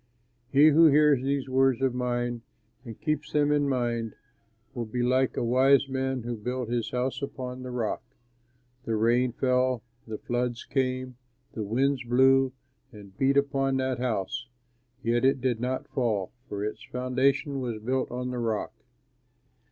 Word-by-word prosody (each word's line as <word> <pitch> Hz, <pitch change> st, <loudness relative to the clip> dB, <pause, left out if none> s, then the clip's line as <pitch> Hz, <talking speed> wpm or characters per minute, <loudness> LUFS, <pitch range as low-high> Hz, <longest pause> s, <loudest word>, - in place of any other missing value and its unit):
"He 145 Hz, +3 st, +7 dB
who 160 Hz, +2 st, +7 dB
hears 150 Hz, -2 st, +5 dB
these 135 Hz, 0 st, -1 dB
words 130 Hz, -1 st, +3 dB
of 130 Hz, -2 st, +2 dB
mine 120 Hz, -1 st, -2 dB, 0.4 s
and 115 Hz, -4 st, -9 dB
keeps 150 Hz, -1 st, -2 dB
them 150 Hz, -1 st, +3 dB
in 145 Hz, -1 st, +2 dB
mind 120 Hz, -4 st, -1 dB, 0.6 s
will 120 Hz, -3 st, -4 dB
be 120 Hz, +3 st, -2 dB
like 130 Hz, +1 st, +1 dB
a -, -, 0 dB
wise 130 Hz, +3 st, +4 dB
man 130 Hz, -2 st, -2 dB
who 120 Hz, 0 st, -3 dB
built 125 Hz, +2 st, -4 dB
his 120 Hz, -2 st, -1 dB
house 125 Hz, +3 st, -2 dB
upon 130 Hz, -2 st, -5 dB
the 125 Hz, -, -6 dB
rock. 120 Hz, -3 st, -2 dB, 0.8 s
The 115 Hz, -, -1 dB
rain 120 Hz, +3 st, +2 dB
fell, 125 Hz, -1 st, +1 dB, 0.2 s
the 110 Hz, -1 st, -5 dB
floods 120 Hz, 0 st, -2 dB
came, 130 Hz, -2 st, -2 dB, 0.4 s
the 110 Hz, -, -4 dB
winds 130 Hz, +6 st, 0 dB
blew 130 Hz, +2 st, +4 dB, 0.4 s
and 100 Hz, -4 st, -13 dB
beat 135 Hz, +3 st, +2 dB
upon 135 Hz, -1 st, +1 dB
that 130 Hz, -1 st, -1 dB
house; 120 Hz, 0 st, -2 dB, 0.6 s
yet 120 Hz, +1 st, +1 dB
it 135 Hz, 0 st, +3 dB
did 125 Hz, -2 st, 0 dB
not 130 Hz, +2 st, -2 dB
fall, 110 Hz, -8 st, -1 dB, 0.2 s
for 100 Hz, 0 st, -3 dB
its 105 Hz, -, -5 dB
foundation 130 Hz, +2 st, 0 dB
was 120 Hz, -4 st, -3 dB
built 130 Hz, +4 st, -1 dB
on 125 Hz, +1 st, -4 dB
the 125 Hz, -, -3 dB
rock. 110 Hz, -2 st, -2 dB
125 Hz, 160 wpm, -27 LUFS, 120-135 Hz, 0.8 s, He